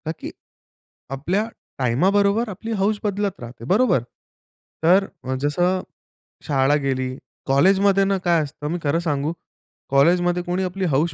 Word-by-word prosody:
का 160 - -1
की - - -6 0.8
आपल्या 185 +10 -1 0.3
टाईमाबरोबर 200 - +2
आपली 225 +3 -6
हौस 205 +1 +1
बदलत 205 -1 -1
राहते, 120 -1 -10
बरोबर? 200 - +3 0.8
तर 185 +4 +5 0.2
अ, 130 +1 -2
जसं 175 +6 +1 0.7
शाळा 140 0 +3
गेली, 130 -1 -1 0.3
कॉलेजमध्ये 195 +8 +4
ना 195 0 +1
काय 170 -2 +3
असतं 150 +1 -7
मी 175 - -2
खरं 150 +3 +1
सांगू, 150 -2 -1 0.6
कॉलेजमध्ये 175 +5 +3
कोणी 180 +1 -1
आपली 185 +1 -2
हौस 155 +4 +1
175 Hz, 135 wpm, -22 LUFS, 140-195 Hz, 0.8 s, तर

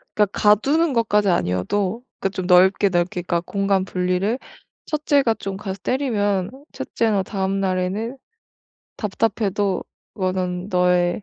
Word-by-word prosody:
그러니까 210 - +4
가두는 275 +10 +3
것까지는 210 -5 +2
아니어도 185 - -1 0.2
그 195 - 0
좀 185 -2 -5
넓게, 190 +2 +5
넓게 175 0 0
그러니까 170 -1 -1
공간분리를 195 +3 0 0.5
첫째가 285 -6 +2
좀 195 -2 -5
가서 195 -1 -6
때리면 205 -8 0 0.2
첫째나 220 -4 0
다음날에는 195 +4 -2 0.8
답답해도 205 -2 -1 0.3
그거는 185 -1 -2
"너의 180 +1 +2
195 Hz, 300 characters per minute, -22 LUFS, 185-215 Hz, 0.8 s, 넓게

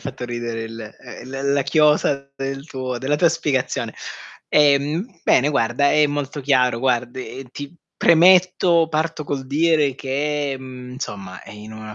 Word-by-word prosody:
fatto 130 -1 -6
ridere 120 -1 -4
il 115 -1 -9 0.3
uhm, 130 - -11
l 135 +1 -1
la 140 - +2
chiosa 140 -1 +2
del 135 +2 -5
tuo 130 -4 -5
della 140 +3 0
tua 170 +2 +4
spiegazione. 145 -5 -2 0.5
Ehm, 150 - +2
bene 135 +3 +3
guarda, 135 +1 +1
è 150 -1 +4
molto 145 0 -4
chiaro, 125 -3 +2
guard 125 -1 -1
e 130 +1 -7
ti 145 +3 -8 0.2
premetto, 175 -1 +4
parto 155 0 -2
col 135 -2 -4
dire 150 -1 +2
che, 140 +1 -2
mhmm, 125 -1 -10
insomma, 100 -8 -7
ehm, - - -12
in 110 +1 -10
una 110 -1 -9
140 Hz, 155 wpm, -21 LUFS, 125-150 Hz, 0.5 s, tua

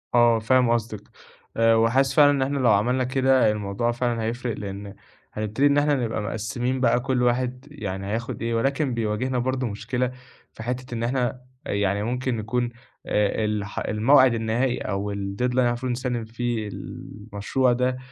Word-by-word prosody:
آه، 120 -1 +5
فاهم 125 +2 +3
قصدِك، 110 -3 -1 0.6
آآ 115 0 +5
وحاسس 130 +4 +3
فعلًا 145 -1 +7
إن 140 - 0
إحنا 140 +2 0
لو 125 -2 +3
عملنا 120 +6 +2
كده 130 -2 +3
الموضوع 105 +3 -1
فعلًا 120 -1 -1
هيفرق، 120 +1 -3
لإن 100 0 -7 0.4
هنبتدي 110 +6 +1
إن 140 0 +3
إحنا 145 0 +3
نبقى 115 -5 -2
مقسّمين 115 +5 -2
بقى 120 0 +3
كل 125 0 0
واحد 125 +2 0
يعني 100 -8 -5
هياخُد 115 +3 -3
إيه 115 0 -1
ولكن 135 +3 0
بيواجهنا 115 +3 -1
برضه 130 +1 -1
مشكلة 115 +4 -2 0.4
في 110 - -9
حتّة 125 +1 -4
إن 115 -1 -2
إحنا 125 0 -1 0.2
يعني 100 0 0
ممكن 125 +1 -1
نكون 120 +3 -1 0.4
آآ 105 +1 +1
الح 105 -1 -2
الموعد 130 +4 +4
النهائي 115 +3 0
أو 100 +1 -3
الdeadline 100 +3 -4
اللي 125 0 +1
إحنا 120 - +3
المفروض 120 +1 -2
نسلِّم 120 -2 -2
فيه 115 -1 -3
المشروع 105 +5 -2
ده، 125 +1 0
120 Hz, 165 wpm, -24 LUFS, 110-130 Hz, 0.6 s, فعلًا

